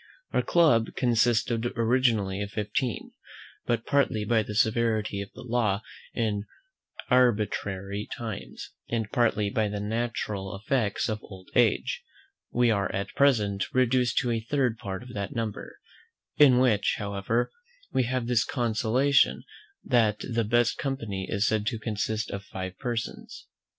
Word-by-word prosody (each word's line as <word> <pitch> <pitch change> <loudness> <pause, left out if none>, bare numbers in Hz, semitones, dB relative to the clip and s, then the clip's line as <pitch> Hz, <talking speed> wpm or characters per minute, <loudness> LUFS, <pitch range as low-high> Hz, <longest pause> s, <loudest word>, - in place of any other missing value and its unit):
Our - - +2
club 150 -10 +3
consisted 120 -1 +1
originally 115 -5 +2
of 100 - -3
fifteen; 105 +4 -2 0.6
but, 115 -1 0
partly 125 -7 +1
by 115 +1 +3
the 105 0 -6
severity 110 -2 +1
of 100 - -7
the - - -9
law 115 -4 0 0.3
in 105 -3 -1 0.7
arbitrary 105 -4 +1
times, 110 - -6 0.2
and 115 -3 -2
partly 110 -4 +1
by 110 0 +1
the 105 0 -4
natural 105 -3 -3
effects 110 0 0
of 110 -2 -3
old 95 -2 -13
age, 305 - +2 0.5
we 120 -1 +3
are 100 -2 0
at 100 +1 -3
present 105 -9 +2
reduced 125 -1 +2
to 120 - 0
a 115 - 0
third 125 -1 0
part 95 +2 -5
of 125 0 -11
that 100 -1 -4
number: 115 -3 -4 0.6
in 135 -4 +7
which, 120 -5 +3
however, 100 +3 -1 0.4
we 130 - +2
have 130 0 -1
this 120 -2 +2
consolation 125 +3 +2 0.4
that 110 -4 +3
the 115 -2 0
best 120 +2 +2
company 115 -9 -3
is 105 -1 +1
said 110 -1 +1
to 115 - 0
consist 110 0 -2
of 100 0 -5
five 95 -2 -6
persons. 120 -3 -5
110 Hz, 140 wpm, -27 LUFS, 105-120 Hz, 0.7 s, in